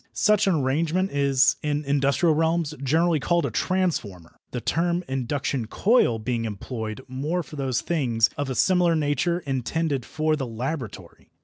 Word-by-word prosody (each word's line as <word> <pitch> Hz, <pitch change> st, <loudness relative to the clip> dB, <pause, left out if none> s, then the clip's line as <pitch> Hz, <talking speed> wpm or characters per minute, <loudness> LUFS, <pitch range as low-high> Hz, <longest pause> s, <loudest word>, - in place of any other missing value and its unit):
Such 210 Hz, -1 st, +3 dB
an 190 Hz, -, +3 dB
arrangement 160 Hz, +7 st, 0 dB
is 140 Hz, -1 st, +3 dB
in 150 Hz, 0 st, -2 dB
industrial 140 Hz, +4 st, +2 dB
realms 160 Hz, 0 st, +1 dB
generally 160 Hz, +4 st, +2 dB
called 170 Hz, +4 st, +1 dB
a -, -, -2 dB
transformer, 120 Hz, -, -2 dB
the 125 Hz, -, -4 dB
term 170 Hz, +6 st, 0 dB
induction 130 Hz, -2 st, -2 dB
coil 195 Hz, -, +3 dB
being 115 Hz, +1 st, -2 dB
employed 110 Hz, +2 st, -5 dB
more 150 Hz, +7 st, -2 dB
for 155 Hz, -, -11 dB
those 135 Hz, -4 st, -1 dB
things 120 Hz, -9 st, +1 dB
of 145 Hz, -1 st, -3 dB
a 130 Hz, -, -2 dB
similar 180 Hz, 0 st, +3 dB
nature 155 Hz, +4 st, 0 dB
intended 140 Hz, 0 st, -2 dB
for 155 Hz, +2 st, 0 dB
the 135 Hz, -4 st, -4 dB
laboratory. 125 Hz, +1 st, -6 dB
145 Hz, 150 wpm, -24 LUFS, 130-165 Hz, -, Such